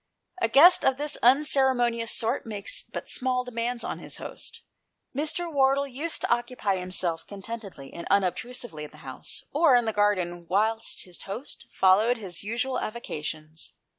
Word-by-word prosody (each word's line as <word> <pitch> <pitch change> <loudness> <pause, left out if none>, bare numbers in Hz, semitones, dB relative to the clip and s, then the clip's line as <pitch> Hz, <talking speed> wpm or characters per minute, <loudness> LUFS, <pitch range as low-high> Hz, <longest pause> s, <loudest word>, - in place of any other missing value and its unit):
A - - +4
guest 305 +10 +7
of 265 -1 +3
this 295 +1 -1
unceremonious 250 -3 +3
sort 230 +4 0
makes 205 -2 -2
but - - -8
small 255 -1 0
demands 240 0 -3
upon - - -4
his - - -6
host. - - -8 0.5
Mr. 315 +4 -1
Wardle 275 0 +3
used 280 +5 -3
to - - +3
occupy 240 -5 -1
himself 180 -2 -2
contentedly 200 -8 -8
and 170 - -7
unob 195 -3 +3
trusively 240 -10 -7
in 150 - -7
the 155 - -17
house 130 -1 -5
or 290 -3 +5
in 240 -1 +3
the 220 - -1
garden 180 -5 0
whilst 220 +4 +1
his 180 -2 -10
host 230 +8 -8
followed 210 +6 +4
his 185 -6 -5
usual 235 +5 -1
avocations. 155 -7 -6
230 Hz, 160 wpm, -27 LUFS, 190-260 Hz, 0.5 s, guest